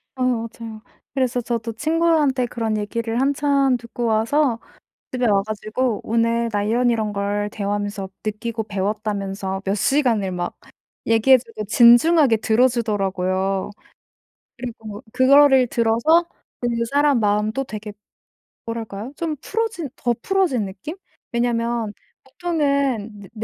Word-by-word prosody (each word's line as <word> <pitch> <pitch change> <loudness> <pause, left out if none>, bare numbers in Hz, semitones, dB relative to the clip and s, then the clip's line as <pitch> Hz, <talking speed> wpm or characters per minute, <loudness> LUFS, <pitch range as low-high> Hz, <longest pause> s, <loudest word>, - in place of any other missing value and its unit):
아이 255 -1 -1
맞아요. 230 -2 -3 0.3
그래서 255 -2 0
저도 230 -1 -3
친구들한테 310 -2 +2
그런 225 -2 -2
얘기를 225 +2 -2
한참 275 -1 +2
듣고 235 0 -5
와서 230 +3 +1 0.5
집에 250 -1 -1
와 200 -2 +3
가지고 215 +2 -2
오늘 230 +1 +1
나 205 -1 0
이런 240 +4 +2
이런 220 -3 0
걸 205 +1 -1
대화하면서 205 -1 -3 0.2
느끼고 220 +1 -3
배웠다면서 200 -1 -3
몇 195 +1 0
시간을 225 -4 +1
막 175 -1 -4 0.5
얘기해 230 +4 +5
주고 230 -3 -8
진중하게 240 +4 +6
들어 225 +4 +3
주더라고요. 195 -5 -1 0.9
그리고 225 -3 -8
그거를 265 0 +6
들어서 235 +9 +2 0.3
그 245 - 0 0.2
사람 285 -2 +3
마음도 210 +5 0
되게 215 -3 -7 0.7
뭐랄까요? 225 +1 -5
좀 320 -3 -3
풀어진 445 -7 -2
더 240 -1 0
풀어진 360 - +1
느낌? 195 - -8 0.4
왜냐면 235 -2 0 0.3
보통은 280 - -1
내 195 - -12
230 Hz, 285 characters per minute, -21 LUFS, 210-260 Hz, 0.9 s, 진중하게